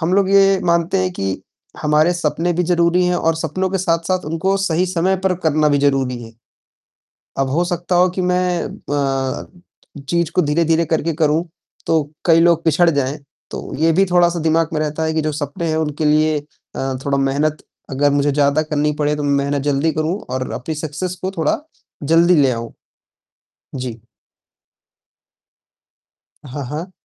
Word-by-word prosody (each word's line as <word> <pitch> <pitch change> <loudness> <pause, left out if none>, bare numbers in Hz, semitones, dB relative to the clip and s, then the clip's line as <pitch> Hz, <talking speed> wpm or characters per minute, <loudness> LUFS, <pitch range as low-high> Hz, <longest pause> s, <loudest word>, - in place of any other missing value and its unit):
हम 170 +2 0
लोग 195 -1 +2
ये 195 -1 +5
मानते 170 +2 +1
हैं 185 0 0
कि 95 - -3 0.4
हमारे 150 +3 +3
सपने 175 +1 -1
भी 180 - 0
ज़रूरी 175 +1 +2
हैं 180 - +1
और 165 -1 +1
सपनों 165 +4 -2
के 195 - -1
साथ-साथ 180 0 0
उनको 165 +5 0
सही 185 -2 0
समय 185 +1 +1
पर 185 -1 +2
करना 155 -1 +3
भी 145 - +2
ज़रूरी 135 -3 0
है। 115 0 -11 1.1
अब 135 -1 +1
हो 170 +5 +1
सकता 175 0 -1
हो 180 +1 +5
कि - - 0
मैं 180 -1 0
अ, 135 -2 -3 0.6
चीज़ 170 -2 0
को 180 - +3
धीरे-धीरे 165 +2 +2
करके 165 +1 -1
करूँ, 155 +1 +1 0.4
तो 160 -1 +2 0.2
कई 165 -1 +5
लोग 170 -1 +3
पिछड़ 170 +2 +3
जाएँ, 140 -1 -1 0.3
तो - - -7
ये 165 +2 +3
भी 190 +4 +4
थोड़ा-सा 175 -1 +3
दिमाग 160 0 +2
में 155 - -1
रहता 155 +1 -2
है 160 0 -1
कि 160 - +1
जो 155 0 -1
सपने 145 +3 -4
हैं 155 - 0
उनके 155 -1 -2
लिए 155 0 +3 0.4
अ, 135 0 -2
थोड़ा 140 -1 0
मेहनत 145 +3 0 0.3
अगर 140 +2 +2
मुझे 145 0 +1
ज़्यादा 145 +1 +2
करनी 150 -1 0
पड़े, 150 0 +1
तो 150 - -4
मैं 145 -1 +1
मेहनत 140 0 -1
जल्दी 145 +2 +1
करूँ 155 +5 -1
और 130 0 -3
अपनी 155 +5 -4
सक्सेस 155 +4 -4
को 190 - -1
थोड़ा 160 - +1 0.5
जल्दी 170 +2 +5
ले 135 - +3
आऊँ। 115 -1 -4 1.0
जी। 125 -3 -5 2.5
हाँ, 140 +2 -6
हाँ। 160 +6 -5
160 Hz, 175 wpm, -19 LUFS, 145-175 Hz, 2.5 s, ये